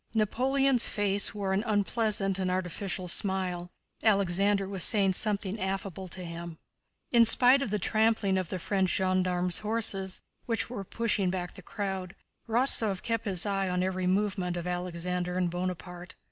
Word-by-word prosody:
Napoleon's 260 +4 +2
face 205 -1 +2
wore 195 -2 -2
an 195 +2 0
unpleasant 205 -2 0
and 185 -1 -1
artificial 185 +1 -3
smile. 180 -1 0 0.3
Alexander 200 -1 +2
was 190 -3 +1
saying 195 -3 +3
something 205 0 -1
affable 190 -1 -4
to 180 0 -6
him. 170 -1 -7 0.5
In 235 -1 +6
spite 250 +4 +6
of 260 - -2
the 210 - 0
trampling 215 -1 +1
of 185 -4 -4
the 185 - -3
French 190 +1 0
gendarmes' 180 -2 +1
horses, 210 -3 -2 0.3
which 230 -1 -1
were 205 -5 -5
pushing 210 -2 -1
back 180 -1 -4
the - - -12
crowd, 190 -3 -5 0.3
Rostóv 225 -5 +1
kept 230 -1 -2
his 190 -3 +2
eyes 195 -2 -1
on 180 0 0
every 185 -1 -1
movement 190 -2 0
of 175 - -5
Alexander 180 0 -3
and 180 -2 0
Bonaparte. 180 0 -5
190 Hz, 155 wpm, -29 LUFS, 180-210 Hz, 0.5 s, In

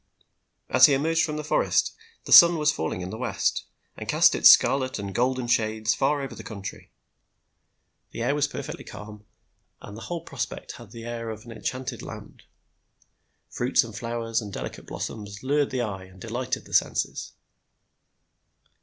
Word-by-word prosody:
As - - +7
he 140 - +3
emerged 160 +4 +1
from 150 -1 -2
the 150 - -4
forest 150 - +1 0.3
the - - -7
sun 170 0 +9
was 150 -1 +3
falling 80 - -3
in 90 +1 -5
the 110 - -7
west, 125 - -1 0.3
and - - -8
cast - - +5
its - - +7
scarlet 130 -1 +5
and 100 -1 -5
golden 125 +2 0
shades 110 -2 +1
far 140 +3 0
over 135 - -6
the - - -9
country. 100 - -8 1.2
The 115 - -5
air 125 - +1
was 145 0 +1
perfectly - - -7
calm, 105 0 -11 0.5
and 105 - -10
the 115 - -9
whole 170 +4 -5
prospect 135 -9 -5
had 120 -4 -13
the 115 +2 -10
air 115 -1 -5
of 110 +1 -8
an 120 - -10
enchanted 125 +2 -5
land. - - -10 1.1
Fruits - - +2
and - - -9
flowers 115 0 -2
and 105 -2 -8
delicate - - -7
blossoms 105 -1 -6
lured 145 +1 +1
the 130 -1 -2
eye 95 -4 -5
and 95 0 -17
delighted 120 +5 -4
the - - -13
senses. - - 0
120 Hz, 170 wpm, -25 LUFS, 105-135 Hz, 1.2 s, sun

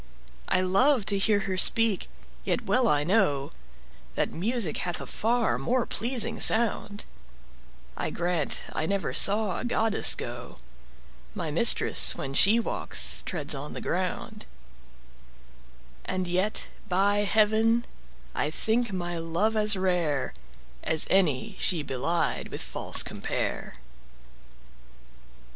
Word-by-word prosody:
I 185 - +1
love 210 +6 +2
to 200 - 0
hear 205 +1 +2
her 190 -1 -3
speak, 225 -1 +2 0.4
yet 245 - -2
well 235 +5 +2
I 145 -6 +2
know 160 -7 0 0.6
That - - -1
music 205 -2 -1
hath 175 -1 -3
a - - -6
far 235 +1 -1
more 250 0 0
pleasing 235 -1 -1
sound; 220 -2 +1 0.9
I - - -3
grant 175 -4 -1
I 155 - -2
never 195 -9 -2
saw 200 +3 +5
a - - -5
goddess 225 -3 +3
go; - - -8 0.8
My - - -4
mistress, - - +4
when 135 - -6
she 205 +10 +4
walks, 230 - -1
treads 155 -4 -3
on 140 +1 -7
the - - -6
ground: 185 +4 -4 1.6
And 185 -1 -3
yet, 185 +5 0 0.2
by 195 +3 +2
heaven, 220 +3 +2 0.5
I - - -1
think 230 0 -1
my 175 -2 -4
love 170 +7 -1
as 215 -1 +3
rare 175 -7 -1 0.5
As 160 - +4
any 190 +2 +1
she 170 -6 0
belied 140 +5 -2
with - - -6
false - - +1
compare. - - -5
195 Hz, 120 wpm, -26 LUFS, 175-220 Hz, 1.6 s, saw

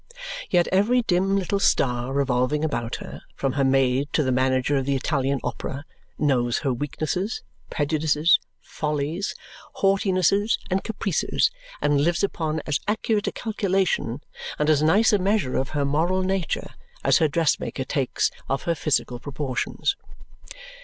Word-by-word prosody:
Yet 175 -2 +3
every 230 +6 +3
dim 195 0 +2
little 195 +1 0
star 125 -8 +1
revolving 135 +2 +1
about 120 -6 -2
her, - - -8
from 135 -2 -1
her 140 - +1
maid 135 +1 +2
to 155 - +3
the 130 - 0
manager 130 +2 +2
of 135 0 -2
the 140 - +2
Italian 135 0 0
Opera, 140 +3 -4 0.3
knows 125 -5 +1
her 135 - +2
weaknesses, 155 - -3 0.3
prejudices, 155 +2 +2 0.2
follies, 150 +5 -3 0.4
haughtinesses, 195 +1 +2
and 190 +1 +1
caprices 200 - 0 0.3
and 145 -1 +3
lives 170 +4 +1
upon 160 -5 -1
as 145 -2 0
accurate 215 0 0
a - - +1
calculation 190 - -1 0.3
and 150 +1 +2
as 150 -1 +3
nice 200 +9 +4
a 205 - +4
measure 195 -7 +1
of 130 - 0
her 140 - +1
moral 170 +6 +1
nature 190 -2 -2 0.3
as - - +4
her 160 - +4
dressmaker 150 -3 0
takes 130 0 0 0.2
of 135 - -1
her 170 - +1
physical 140 -6 -1
proportions. 145 - -2
150 Hz, 145 wpm, -24 LUFS, 135-190 Hz, 0.4 s, nice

